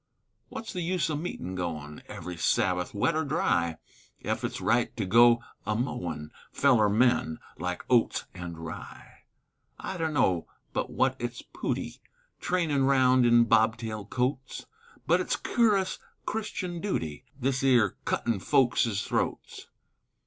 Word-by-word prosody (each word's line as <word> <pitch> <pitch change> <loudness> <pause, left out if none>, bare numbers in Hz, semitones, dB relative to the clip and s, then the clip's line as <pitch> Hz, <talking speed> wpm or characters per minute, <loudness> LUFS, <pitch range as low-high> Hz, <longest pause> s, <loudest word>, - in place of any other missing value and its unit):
Wut's 225 - -7
the 180 - -3
use 175 -1 0
o' - - -1
meetin' 145 - -5
goin' 80 -5 -5
Every 90 +1 -7
Sabbath, 90 +2 +1
wet 155 +10 +1
or 160 - +1
dry, 85 - 0 0.5
Ef - - -2
it's - - -3
right 120 +1 +1
to 105 - -1
go 115 +4 +6 0.2
amowin' 90 - -3 0.2
Feller 120 -7 +4
men 110 -7 +2 0.2
like 90 +1 -3
oats 120 -2 +2
an' 90 -2 -7
rye? 80 0 -10 0.5
I 190 - -5
dunno 145 - +1 0.3
but - - -1
what - - +1
it's - - -5
pooty - - -3 0.4
Trainin' 160 -7 +1
round 130 -2 +4
in 120 0 +6
bobtail 110 -1 +1
coats, 130 +2 -2 0.4
But - - +3
it's - - 0
curus 205 -5 +1 0.3
Christian 185 -5 -3
dooty 80 - -3 0.2
This 130 0 0
'ere 120 -7 +4
cuttin' 115 -4 0
folks's 120 -2 +2
throats. - - -3
120 Hz, 130 wpm, -28 LUFS, 90-145 Hz, 0.5 s, go